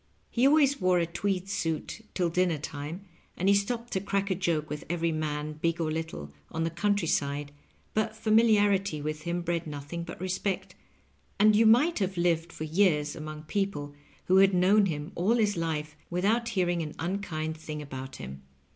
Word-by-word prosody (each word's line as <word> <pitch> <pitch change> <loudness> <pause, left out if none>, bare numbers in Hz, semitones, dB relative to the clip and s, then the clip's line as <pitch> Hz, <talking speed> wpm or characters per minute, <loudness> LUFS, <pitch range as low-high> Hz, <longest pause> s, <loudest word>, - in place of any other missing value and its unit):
He 250 +3 +4
always 285 -4 +4
wore 185 -1 +4
a 170 - +2
tweed 185 +2 -2
suit 195 +1 -3
till 175 -3 +1
dinner 180 -2 +2
time, 150 +5 -6 0.3
and 185 - 0
he 200 - +7
stopped 235 +4 -1
to 190 - +1
crack 200 0 -1
a - - +4
joke 170 -4 0
with 150 0 -5
every 170 -1 0
man, 155 -1 -3
big 165 0 +1
or 160 -2 0
little, 155 - -5 0.2
on 160 - -2
the 165 - -1
country 200 +1 +1
side, 145 0 -1 0.4
but 215 0 0
familiarity 205 -6 +3
with 155 +1 -4
him 170 0 -1
bred 170 -1 -1
nothing 150 +3 -5
but 170 - -8
respect, 185 +1 -2 0.7
and 210 +1 +6
you 225 +1 +5
might 260 +9 +5
have 190 -2 -1
lived 170 -1 +1
for - - -6
years 155 -3 +2
among 155 0 -7
people 155 -5 -2 0.3
who 185 - +4
had 195 0 +6
known 195 +3 +5
him 150 -3 -4
all 195 +7 +2
his 210 -3 +2
life, 155 -2 -2
without 215 +7 +1
hearing 175 -3 +1
an 155 -1 -5
unkind 165 -3 -3
thing 155 -1 -6
about 135 -2 -7
him. 70 0 -8
175 Hz, 180 wpm, -29 LUFS, 155-200 Hz, 0.7 s, he